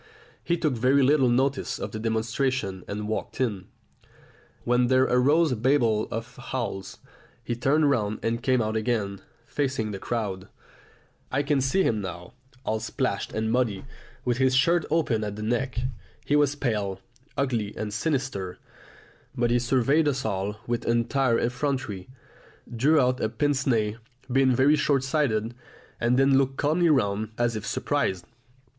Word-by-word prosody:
He 170 Hz, -, 0 dB
took 155 Hz, -4 st, 0 dB
very 130 Hz, +4 st, +3 dB
little 135 Hz, -1 st, +4 dB
notice 135 Hz, +3 st, +1 dB
of -, -, -5 dB
the 110 Hz, -, -5 dB
demonstration 110 Hz, -2 st, -1 dB
and 105 Hz, +1 st, -4 dB
walked 110 Hz, +2 st, -4 dB
in, 105 Hz, -8 st, -1 dB, 1.0 s
when 125 Hz, 0 st, +2 dB
there 130 Hz, +1 st, +4 dB
arose 145 Hz, +6 st, +3 dB
a -, -, +1 dB
babel 115 Hz, -3 st, +2 dB
of 115 Hz, +2 st, -6 dB
howls. 115 Hz, -7 st, -4 dB, 0.5 s
He 120 Hz, -, -2 dB
turned 145 Hz, +5 st, +2 dB
round 110 Hz, -6 st, +1 dB
and 115 Hz, +1 st, -1 dB
came 130 Hz, -2 st, +2 dB
out 110 Hz, 0 st, -2 dB
again, 110 Hz, -4 st, -1 dB, 0.2 s
facing 130 Hz, -7 st, -2 dB
the 100 Hz, -, -5 dB
crowd. 100 Hz, -6 st, -3 dB, 0.8 s
I 140 Hz, +2 st, +1 dB
can 145 Hz, -1 st, +1 dB
see 135 Hz, +9 st, +2 dB
him 110 Hz, -2 st, +1 dB
now, 90 Hz, +1 st, -7 dB, 0.3 s
all 110 Hz, 0 st, 0 dB
splashed 115 Hz, -1 st, -2 dB
and 110 Hz, 0 st, -1 dB
muddy, 115 Hz, -4 st, 0 dB, 0.4 s
with 120 Hz, -1 st, +1 dB
his 130 Hz, -1 st, +3 dB
shirt 170 Hz, +4 st, +3 dB
open 145 Hz, -9 st, +1 dB
at 105 Hz, -1 st, -4 dB
the 105 Hz, -, -6 dB
neck. 120 Hz, +3 st, -1 dB, 0.5 s
He 145 Hz, -, +2 dB
was 145 Hz, -1 st, +3 dB
pale, 105 Hz, -8 st, -2 dB, 0.4 s
ugly, 120 Hz, -7 st, 0 dB
and 105 Hz, -1 st, -4 dB
sinister; 125 Hz, -, -2 dB, 0.8 s
but 120 Hz, -1 st, +1 dB
he 120 Hz, -, +3 dB
surveyed 135 Hz, +5 st, +2 dB
us 130 Hz, -4 st, -1 dB
all 100 Hz, 0 st, -2 dB
with 120 Hz, 0 st, -2 dB
entire 120 Hz, +1 st, +2 dB
effrontery, 125 Hz, -6 st, -2 dB, 0.7 s
drew 150 Hz, +7 st, +4 dB
out 125 Hz, -1 st, +2 dB
a 110 Hz, -, +1 dB
pince 140 Hz, +5 st, 0 dB
nez, 110 Hz, -4 st, +1 dB, 0.3 s
being 130 Hz, 0 st, +4 dB
very 135 Hz, +4 st, +5 dB
short 140 Hz, -3 st, +1 dB
sighted, 125 Hz, -6 st, 0 dB, 0.5 s
and 120 Hz, +1 st, +2 dB
then 135 Hz, 0 st, +5 dB
looked 135 Hz, 0 st, 0 dB
calmly 165 Hz, +4 st, +2 dB
round 105 Hz, -7 st, +1 dB
as 120 Hz, -1 st, +1 dB
if 110 Hz, -, -5 dB
surprised. 90 Hz, -2 st, -1 dB
120 Hz, 155 wpm, -26 LUFS, 110-135 Hz, 1.0 s, very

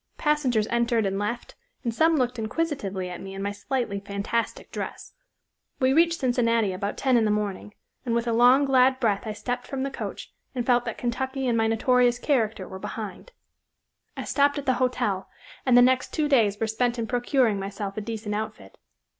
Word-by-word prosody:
Passengers 275 Hz, -8 st, +1 dB
entered 235 Hz, -2 st, +2 dB
and 195 Hz, 0 st, -1 dB
left, 225 Hz, +4 st, -3 dB, 0.3 s
and 235 Hz, -3 st, -1 dB
some 320 Hz, +7 st, +3 dB
looked 250 Hz, -4 st, 0 dB
inquisitively 215 Hz, -, -2 dB
at 180 Hz, -1 st, -7 dB
me 195 Hz, 0 st, -8 dB
and 195 Hz, -, -5 dB
my 200 Hz, -, -1 dB
slightly 225 Hz, -1 st, -2 dB
fantastic 200 Hz, +3 st, -3 dB
dress. -, -, -6 dB, 0.7 s
"We 260 Hz, -1 st, +3 dB
reached 335 Hz, +2 st, +3 dB
Cincinnati 230 Hz, -5 st, +2 dB
about 200 Hz, +2 st, -3 dB
ten 260 Hz, -3 st, +3 dB
in 230 Hz, -, +3 dB
the -, -, +2 dB
morning, 210 Hz, 0 st, -2 dB, 0.3 s
and 235 Hz, -3 st, -1 dB
with 235 Hz, 0 st, 0 dB
a 230 Hz, -, +1 dB
long 250 Hz, +4 st, +6 dB
glad 260 Hz, -1 st, +4 dB
breath 215 Hz, -3 st, 0 dB
I 215 Hz, -, -2 dB
stepped 245 Hz, +4 st, -4 dB
from 265 Hz, -1 st, -3 dB
the 275 Hz, -, -2 dB
coach, -, -, -6 dB, 0.2 s
and 245 Hz, -2 st, -1 dB
felt 245 Hz, -1 st, +3 dB
that 230 Hz, -, -4 dB
Kentucky 265 Hz, +2 st, -2 dB
and 240 Hz, -2 st, +1 dB
my 225 Hz, -1 st, +2 dB
notorious 245 Hz, +2 st, +3 dB
character 225 Hz, -8 st, 0 dB
were 190 Hz, -, -8 dB
behind. 215 Hz, -, -7 dB, 0.9 s
I -, -, -3 dB
stopped 285 Hz, 0 st, +2 dB
at 285 Hz, -, -4 dB
the 260 Hz, -, +3 dB
—— 255 Hz, -, -4 dB
Hotel, 205 Hz, -6 st, 0 dB, 0.4 s
and 245 Hz, -1 st, +6 dB
the 245 Hz, -, +8 dB
next 255 Hz, 0 st, +2 dB
two 305 Hz, -1 st, 0 dB
days 220 Hz, -8 st, +3 dB
were 225 Hz, -, +1 dB
spent 240 Hz, +2 st, 0 dB
in 230 Hz, -, -1 dB
procuring 245 Hz, -2 st, +1 dB
myself 195 Hz, 0 st, -5 dB
a 215 Hz, -, -3 dB
decent 215 Hz, -1 st, -4 dB
outfit. 205 Hz, -, -6 dB
235 Hz, 195 wpm, -26 LUFS, 210-260 Hz, 0.9 s, the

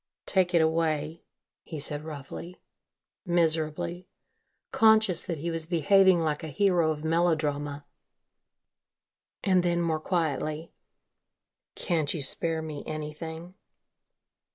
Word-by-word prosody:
"Take 180 Hz, -2 st, +1 dB
it 165 Hz, -, +5 dB
away," 160 Hz, 0 st, 0 dB, 0.4 s
he 160 Hz, -, -8 dB
said 145 Hz, +1 st, -3 dB
roughly, 155 Hz, +3 st, -8 dB, 0.6 s
miserably, 170 Hz, 0 st, 0 dB, 0.6 s
conscious 220 Hz, -5 st, +4 dB
that 170 Hz, -, -3 dB
he 170 Hz, +4 st, -3 dB
was 165 Hz, -1 st, 0 dB
behaving 185 Hz, +1 st, +4 dB
like 155 Hz, -2 st, -1 dB
a -, -, -4 dB
hero 175 Hz, +1 st, +2 dB
of 155 Hz, -1 st, -3 dB
melodrama, 155 Hz, -3 st, 0 dB, 1.6 s
and 185 Hz, -2 st, +3 dB
then 175 Hz, -1 st, +1 dB
more 165 Hz, -2 st, 0 dB
quietly, 155 Hz, -1 st, -2 dB, 1.0 s
"can't 160 Hz, -3 st, -1 dB
you 150 Hz, -, -3 dB
spare 160 Hz, +4 st, -1 dB
me 150 Hz, -2 st, -6 dB
anything?" 160 Hz, +3 st, -6 dB
160 Hz, 105 wpm, -28 LUFS, 155-175 Hz, 1.6 s, it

